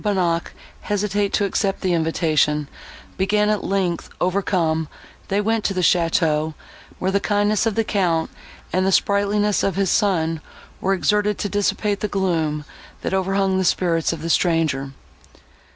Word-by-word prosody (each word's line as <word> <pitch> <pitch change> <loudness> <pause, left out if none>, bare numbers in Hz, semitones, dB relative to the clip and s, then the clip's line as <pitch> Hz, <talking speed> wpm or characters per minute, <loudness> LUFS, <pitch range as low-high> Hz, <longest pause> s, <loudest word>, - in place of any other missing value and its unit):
Bonnac 180 -5 0 0.3
hesitate 205 0 -1
to 205 - +2
accept 195 0 -1
the 185 -2 +1
invitation, 155 -3 +1 0.5
being 210 +2 +2
at 210 - -1
length 190 -3 -1
overcome, 175 -4 0 0.4
they 200 - 0
went 220 +1 0
to 195 - 0
the 185 - 0
château, 160 -3 +2 0.4
where 190 - -1
the 200 - +2
kindness 205 +2 +1
of 220 - -1
the 225 - +2
Count 175 -6 0 0.4
and 185 - +2
the 190 - +2
sprightliness 205 +1 +2
of 195 - 0
his 195 -1 +1
son 165 -6 +1 0.4
were 195 +1 +1
exerted 210 +2 +1
to - - -2
dissipate 205 0 0
the 210 - -1
gloom, 165 -7 -1 0.4
that - - -3
overhung 190 0 +1
the - - +1
spirits 170 -3 +1
of 165 -2 -6
the 165 - -3
stranger. 160 -7 +1
190 Hz, 150 wpm, -21 LUFS, 165-205 Hz, 0.5 s, to